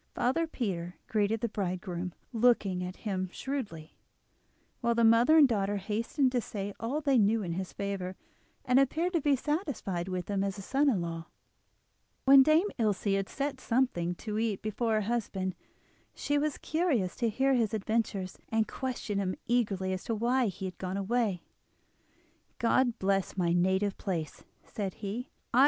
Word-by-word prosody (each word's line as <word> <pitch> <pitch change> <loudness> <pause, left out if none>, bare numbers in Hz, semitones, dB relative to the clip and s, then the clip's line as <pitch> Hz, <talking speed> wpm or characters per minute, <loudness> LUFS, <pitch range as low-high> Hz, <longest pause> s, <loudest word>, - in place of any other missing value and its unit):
Father 325 +7 +1
Peter 180 - -3
greeted 215 +1 0
the 235 - +1
bridegroom, 185 -3 -3 0.2
looking 215 -6 +3
at 180 +1 -5
him 185 -3 -1
shrewdly, 210 - -5 0.8
while 235 -2 +1
the 235 - +3
mother 230 +7 +6
and 295 -3 +8
daughter 205 -4 0
hastened 225 +7 0
to 250 -1 +1
say 205 -3 -5
all 265 +7 -2
they 275 -4 +3
knew 215 +1 +3
in 175 - -3
his 185 +1 -4
favour, 195 -2 -4 0.5
and 250 +1 +5
appeared 320 +7 +1
to 335 - +2
be 285 0 +3
satisfied 265 - -2
with 185 -2 -3
him 200 -1 0
as 200 0 -2
a - - -6
son 280 +7 +2
in 205 -9 +1
law. 165 0 -5 1.0
When 270 0 +9
Dame 310 +8 +4
Ilse 210 -4 +1
had 195 0 0
set 280 -1 -3
something 230 -9 +1
to 215 +3 -4
eat 220 -3 -1
before 220 +2 0
her 215 - +2
husband, 200 -4 -2 0.6
she 290 0 0
was 300 0 -1
curious 300 - 0
to 235 -2 +1
hear 270 +5 +2
his 230 -5 +2
adventures, 210 -3 -1
and 220 -1 +1
questioned 235 -6 -3
him 185 -1 -1
eagerly 200 -6 +1
as 185 - -4
to 230 - -1
why 240 +3 +2
he 190 0 -5
had 185 -1 -6
gone 185 +1 -3
away. 200 -3 0 1.1
"God 240 0 +2
bless 195 0 0
my 170 -2 +2
native 190 +3 +1
place," 165 -6 -4 0.2
said 195 -3 -4
he. 225 +6 -5
215 Hz, 165 wpm, -30 LUFS, 190-250 Hz, 1.1 s, When